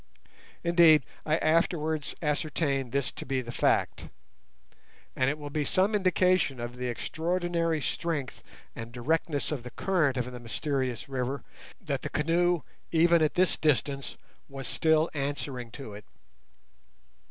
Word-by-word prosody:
Indeed, 170 -3 +6 0.2
I 155 +1 +3
afterwards 160 -2 +1
ascertained 145 -3 0
this 140 -1 0
to - - -7
be 135 0 -1
the 120 -2 -5
fact, - - +1 1.1
and 130 0 +2
it 145 - -2
will 145 -1 -7
be 150 0 0
some 190 +8 +2
indication 185 -8 +2
of 120 +1 -5
the 125 0 -3
extraordinary 165 +5 -1
strength 145 +3 -3 0.3
and 115 +1 -7
directness 145 +5 -1
of 145 -5 -2
the 125 - -8
current 155 -5 +1
of 125 0 -2
the 125 - -8
mysterious 130 0 -2
river 135 0 -3 0.4
that - - -3
the - - -4
canoe, 170 +2 +2 0.3
even 170 0 +5
at 155 - +2
this 185 0 +3
distance, 140 -2 0 0.3
was 135 -1 -7
still 160 0 +3
answering 135 -4 -3
to 135 -7 -8
it. 105 +1 -10
150 Hz, 140 wpm, -29 LUFS, 130-165 Hz, 1.1 s, Indeed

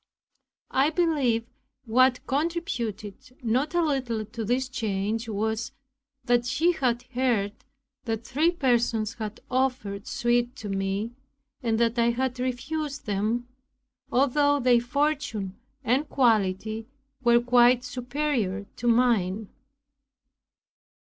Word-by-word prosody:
I 275 +3 +3
believe 295 -9 +1 0.4
what 250 +2 +3
contributed 255 - -3
not 260 +8 0
a 345 - +3
little 255 -8 -1
to 225 +2 -6
this 250 +4 0
change 220 -1 -2
was, 220 +1 -2 0.5
that 240 0 +2
she 315 +7 +3
had 250 -7 0
heard 235 -6 +1 0.5
that 225 0 -3
three 300 +7 +2
persons 235 - +1
had 215 -2 -6
offered 250 -6 -1
suit 240 +1 +1
to 210 - -7
me, 195 +3 -1 0.5
and 225 -3 0
that 235 +1 +2
I 235 0 +4
had 250 +1 -1
refused 275 +3 -3
them, 215 +4 -1 0.6
although 285 +2 +3
their 245 -2 +4
fortune 260 -7 -1 0.3
and 265 +5 +1
quality 220 -2 +1 0.4
were 235 0 +6
quite 245 0 +4
superior 250 -6 -2
to 240 - -3
mine. 220 -4 +2
240 Hz, 110 wpm, -26 LUFS, 220-265 Hz, 0.6 s, were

